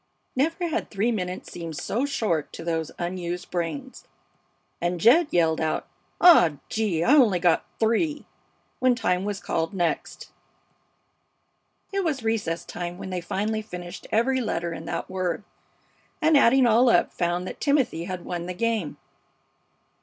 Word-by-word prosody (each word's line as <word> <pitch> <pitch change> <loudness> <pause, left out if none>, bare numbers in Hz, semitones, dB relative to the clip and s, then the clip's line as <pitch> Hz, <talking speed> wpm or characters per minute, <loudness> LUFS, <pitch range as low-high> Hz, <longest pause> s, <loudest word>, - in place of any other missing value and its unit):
Never 330 +6 0
had 320 - -2
three 215 +4 0
minutes 185 -4 -4
seemed 165 -3 -6
so 250 +6 -1
short 205 - -1
to - - -7
those 165 -2 -2
unused 175 0 -4
brains, 185 +11 -4 0.7
and 175 0 -1
Jed 275 - +6
yelled 165 -2 +2
out: 155 -1 -1 0.3
"Aw, 310 - +7 0.2
gee! 205 -7 0
I 250 - +4
only 240 -11 +5
got 175 -2 +2
three!" 295 +8 +1 0.5
when 255 -1 +3
time 190 -5 0
was 205 -1 -3
called 165 +1 -2
next. 175 -3 -2 1.6
It 395 0 0
was 290 -8 -1
recess 205 -7 -1
time 175 0 -5
when 190 - -7
they 180 -1 -2
finally 215 +5 -2
finished 180 -3 -8
every 260 +4 +2
letter 170 -7 -2
in 160 - -8
that - - -3
word, 185 0 -2 0.8
and, 315 -2 +4
adding 265 -1 +5
all 240 +2 +5
up, - - +3
found 175 +1 -1
that - - -8
Timothy 275 - +1
had 185 -1 -6
won 175 -1 -4
the 180 - -5
game. 220 -6 -1
190 Hz, 150 wpm, -25 LUFS, 175-245 Hz, 1.6 s, Aw